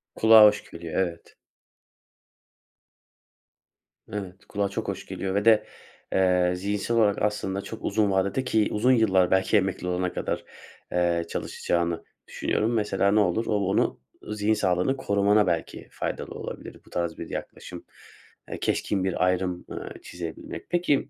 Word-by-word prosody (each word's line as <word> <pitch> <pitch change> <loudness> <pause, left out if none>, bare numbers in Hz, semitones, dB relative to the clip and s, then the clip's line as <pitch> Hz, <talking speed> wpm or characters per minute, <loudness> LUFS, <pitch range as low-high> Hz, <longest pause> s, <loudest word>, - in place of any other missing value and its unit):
Kulağa 110 -1 +8
hoş 105 0 +2
geliyor, 85 +1 -3
evet. 85 -2 -5 2.8
Evet, 95 -2 -6
kulağa 100 -1 -1
çok 100 - -4
hoş - - -4
geliyor 95 0 -4
ve 100 +1 0
de, 110 -2 +5 0.5
eee, 90 -1 +3
zihinsel 100 +5 -1
olarak 105 -3 +3
aslında 100 -2 -1
çok 110 - -9
uzun 105 -2 +1
vadede 95 +7 +1
ki 110 -4 +2
uzun 115 +5 +3
yıllar, 95 -7 +3
belki 95 +3 +3
emekli 95 -2 -1
olana 90 0 -1
kadar, - - -3 0.5
eee, 85 -1 +1
çalışacağını 85 -1 -2 0.2
düşünüyorum. 110 +3 -1
Mesela, 105 -3 +1
ne 105 - +4
olur, 105 +3 +1
o - - 0
onu 100 -1 +1 0.3
zihin 105 0 +1
sağlığını 95 +5 +1
korumana 100 -3 +3
belki 85 -2 -2
faydalı - - -4
olabilir, - - -8
bu - - -18
tarz 85 -2 -2
bir - - -7
yaklaşım, - - -7 0.6
eee, - - -5
keskin 95 -2 0
bir 95 -1 +1
ayrım, 90 -1 -1
ııı, - - -7
çizebilmek. 85 -2 -7
Peki, 170 -6 +1
100 Hz, 140 wpm, -26 LUFS, 90-105 Hz, 2.8 s, Kulağa